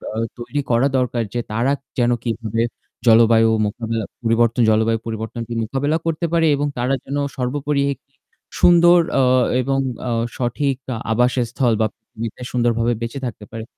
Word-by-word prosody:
আ - - -4 0.2
তৈরি 140 +4 -3
করা 120 +3 +3
দরকার 125 -2 0
যে 120 - -1
তারা 120 +5 +1 0.3
যেন 120 0 +2
কীভাবে 115 -1 -2 0.5
জলবায়ু 115 0 +6 0.2
মোকাবেলা 115 +1 -3 0.2
পরিবর্তন 115 +1 +2
জলবায়ু 110 +1 +2
পরিবর্তনকে 115 +1 -5
মোকাবেলা 140 +7 0
করতে 165 +1 -1
পারে 165 -1 +3
এবং 145 +1 -1
তারা 125 +3 0
যেন 140 +1 -4 0.2
সর্বোপরি 140 +3 -1
একটি 135 +1 -24 0.5
সুন্দর 175 0 +6 0.2
আ - - +4 0.4
এবং 135 +1 0 0.3
আ - - -1 0.3
সঠিক 130 +3 0 0.2
আ - - -4
আবাসস্থল 125 0 +1
বা 110 - +3
পৃথিবীতে 115 +1 -8
সুন্দরভাবে 120 -1 +1
বেঁচে 115 +4 -4
থাকতে 105 -2 -8
পারে। 115 -1 -5
120 Hz, 150 wpm, -20 LUFS, 115-135 Hz, 0.5 s, জলবায়ু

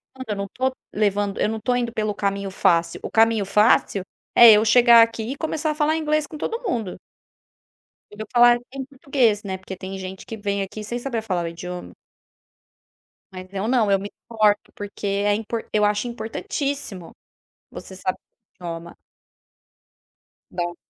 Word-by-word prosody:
estudando, 260 -3 -9
eu 210 - -1
não 200 - -2
estou 260 +6 -2 0.2
levando 205 -1 0
eu - - +2
não 225 - -3
estou 245 +3 0
indo 240 -1 -1
pelo 215 -2 -1
caminho 200 -1 -2
fácil, 170 -3 +1
o - - -5
caminho 225 -2 +3
fácil 210 -1 +3 0.3
é 235 -1 +10
eu 210 +1 +4
chegar 235 +1 +7
aqui 230 -1 +1
e - - -12
começar 310 -1 -2
a - - -5
falar 310 +1 +1
inglês 305 -1 0
com 305 - -9
todo 460 +9 -3
mundo. 230 - -2 1.2
Eu 215 +1 -8
falar 240 0 +6
em 270 -1 -5
português, 260 -6 0
né, 190 -1 -3
porque 190 0 -9
tem 190 +1 -7
gente 190 0 -8
que 225 - -6
vem 200 -1 -2
aqui 210 +2 -6
sem 240 +3 -4
saber 240 -3 -3
falar 180 -5 -2
o - - -2
idioma. 180 +1 -7 1.4
Mas 185 0 -9
eu 200 +3 -2
não, 235 -5 +2
eu 195 - +4
me 200 +1 -7 0.2
importo, 215 -2 +1
porque 205 0 -7
é 200 +1 +1
impor 225 +1 -4
eu 210 -1 +3
acho 210 +3 +1
importantíssimo 230 - -5 0.6
você 190 - -10
sab 185 0 -2 0.4
idioma. 170 -1 -7 1.5
Dó. 175 -1 -3
210 Hz, 170 wpm, -23 LUFS, 195-240 Hz, 1.5 s, é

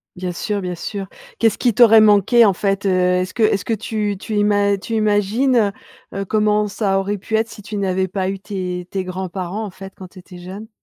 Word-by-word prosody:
Bien 180 0 -4
sûr, 200 +3 -3
bien 180 -1 -4
sûr. 195 +3 -5 0.3
Qu'est-ce 225 -3 +3
ce - - -10
qui 240 -3 +2
t'aurait 225 -1 +7
manqué 215 +3 +5
en 200 - +4
fait, 195 +1 -1
heu? - - +3
Est-ce 180 0 +1
que 230 - 0
est-ce 200 -2 +2
que 230 - -1
tu 210 -1 -2
tu 215 +1 -5
ima 205 -1 +2
tu 225 +4 -5
imagines, 215 +2 +2 0.4
heu - - -5
heu, 195 - -3
comment 210 +1 +1
ça 195 -1 0
aurait 200 +1 -3
pu 220 +3 -3
être 220 +1 +1
si 210 - -11
tu 210 +1 -6
n'avais 190 -1 0
pas 190 0 -2
eu 195 0 -4
tes 185 -3 -5
tes 190 -1 -3
grands-parents, 185 +2 -5
en 210 - -5
fait, 195 +1 -11
quand 190 -2 -10
tu 185 - -14
étais 180 0 -13
jeune? 195 +5 -9
200 Hz, 235 wpm, -19 LUFS, 185-215 Hz, 0.4 s, t'aurait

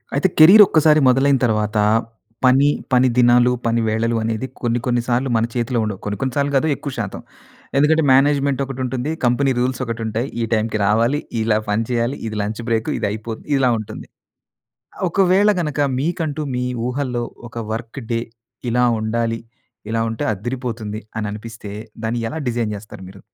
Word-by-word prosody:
అయితే 145 - +3
కెరియర్ 190 +7 +10
ఒక్కసారి 155 -2 +4
మొదలైన 135 +2 +3
తరువాత 105 -1 0 0.7
పని, 135 +3 +5 0.3
పని 125 +1 +5
దినాలు, 120 0 +5
పని 115 0 +1
వేళలు 115 +2 0
అనేది 110 +2 -2 0.2
కొన్ని 120 0 0
కొన్ని 120 -1 +1
సార్లు 125 +2 0
మన 115 0 +2
చేతిలో 120 0 0
ఉండవు. 105 -3 -4
కొన్ని 105 -1 -3
కొన్ని 130 -2 -1
సార్లు 140 0 +1
కాదు 135 +4 +2
ఎక్కువ 140 - -6
శాతం. 100 -4 -4 0.6
ఎందుకంటే 155 +3 +4
మేనేజ్మెంట్ 140 0 +3
ఒకటి 135 -1 -7
ఉంటుంది. 130 +3 -3
కంపెనీ 130 +3 +2
రూల్స్ 125 +1 -1
ఒకటి 115 -1 -4
ఉంటాయి. 110 +4 -2
ఈ - - +1
టైమ్‌కి 110 0 0
రావాలి, 115 +7 +2 0.2
ఇలా 110 -1 +2
పని 105 +2 +1
చేయాలి, 120 +2 -1
ఇది 110 -1 -5
లంచ్ 105 +3 -4
బ్రేకు, 115 -1 0
ఇది - - 0
అయిపోద్ 110 +1 -6
ఇలా 130 -2 +3
ఉంటుంది. 110 - -8 0.9
ఆహ్, - - -2
ఒకవేళ 195 +3 +3
గనక 150 -3 -2 0.2
మీకంటూ 155 -1 -2
మీ 125 - -1 0.2
ఊహల్లో 125 -2 -2 0.2
ఒక 115 - -18 0.2
వర్క్ 115 +4 -5
డే 115 - +1 0.5
ఇలా 125 +1 +2 0.2
ఉండాలి. 115 +1 -1 0.5
ఇలా 115 0 0
ఉంటే 110 - -3
అద్దిరిపోతుంది 115 -1 -4 0.2
అని 110 - -2
అనిపిస్తే, 110 -1 -8 0.3
దాన్ని 115 +2 -1
ఎలా 160 - -4
డిజైన్ 115 -3 -1
జెస్తారు 100 -2 -11
మీరు? 100 0 -14
120 Hz, 165 wpm, -20 LUFS, 110-135 Hz, 0.9 s, కెరియర్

